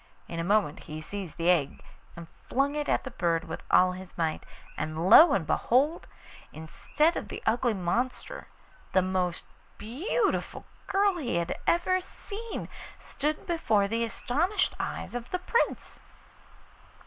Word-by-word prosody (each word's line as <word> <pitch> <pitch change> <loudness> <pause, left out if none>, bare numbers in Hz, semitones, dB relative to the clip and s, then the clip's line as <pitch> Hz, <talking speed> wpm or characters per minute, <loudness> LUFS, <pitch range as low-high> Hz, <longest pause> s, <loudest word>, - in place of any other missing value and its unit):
In 165 - -5
a - - -1
moment 195 -5 +1
he 155 0 -5
seized 185 +1 -7
the 170 +2 +3
egg 150 -6 0 0.3
and 170 -1 -8 0.2
flung 275 +2 +1
it 295 -1 -2
at - - +1
the 265 - -7
bird 170 -6 0
with - - -7
all 185 0 +5
his 185 0 -10
might, 160 -2 -2 0.3
and 155 +3 -3
lo 330 - +10
and 180 -5 +1
behold! 280 - +1 0.4
instead 300 - 0
of - - -4
the - - -7
ugly 235 0 +2
monster 215 +8 -2 0.5
the 185 - +4
most 185 -2 -1 0.3
beautiful 330 - -2 0.2
girl 395 -1 +2
he 255 - -2
had 170 0 -1
ever 370 +2 +2
seen 425 +4 -7 0.3
stood 300 +2 -3
before 220 - +1
the 230 +3 -1
astonished 305 - 0
eyes - - -4
of 245 0 -5
the 365 - -1
Prince. 465 +6 -1
230 Hz, 150 wpm, -28 LUFS, -, 0.5 s, lo